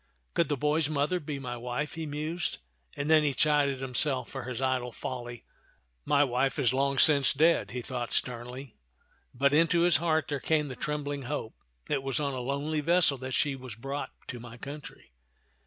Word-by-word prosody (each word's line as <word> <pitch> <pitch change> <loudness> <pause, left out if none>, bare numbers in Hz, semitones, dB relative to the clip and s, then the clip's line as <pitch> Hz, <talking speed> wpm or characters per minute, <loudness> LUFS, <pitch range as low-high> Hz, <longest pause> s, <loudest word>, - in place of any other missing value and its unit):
" - - -44
Could 170 - +1
the 145 - 0
boy's 150 +2 +1
mother 155 +4 0
be 145 -3 -5
my 125 -3 -5
wife?" 125 +5 -3
he 160 -1 -5
mused, 155 - -3 0.4
and 140 - -3
then 155 0 +6
he 145 -3 0
chided 145 -3 +3
himself 130 0 +2
for - - -6
his 125 -1 -4
idle 130 -2 0
folly. 120 -1 -6 0.6
"My 145 -1 +4
wife 135 0 0
is 130 -4 +2
long 140 +1 +1
since 140 -1 +6
dead," 160 0 +3
he 125 +3 -5
thought 120 -2 -4
sternly; 125 +1 -3 0.5
but 140 +3 +2
into 165 +2 +4
his 170 -3 +5
heart 160 0 +1
there 145 -2 -1
came 150 0 +1
the 130 - -6
trembling 145 -1 -3
hope, 145 -7 -3 0.2
" - - -44
It 140 -2 0
was 135 -1 -1
on 140 -2 -1
a 130 - -3
lonely 140 +4 -1
vessel 165 -3 +3
that 130 0 -3
she 145 -2 +1
was 130 -4 -9
brought 135 +5 -4 0.2
to 125 - -5
my 120 0 -10
country. 140 - -10
140 Hz, 195 wpm, -29 LUFS, 125-150 Hz, 0.6 s, then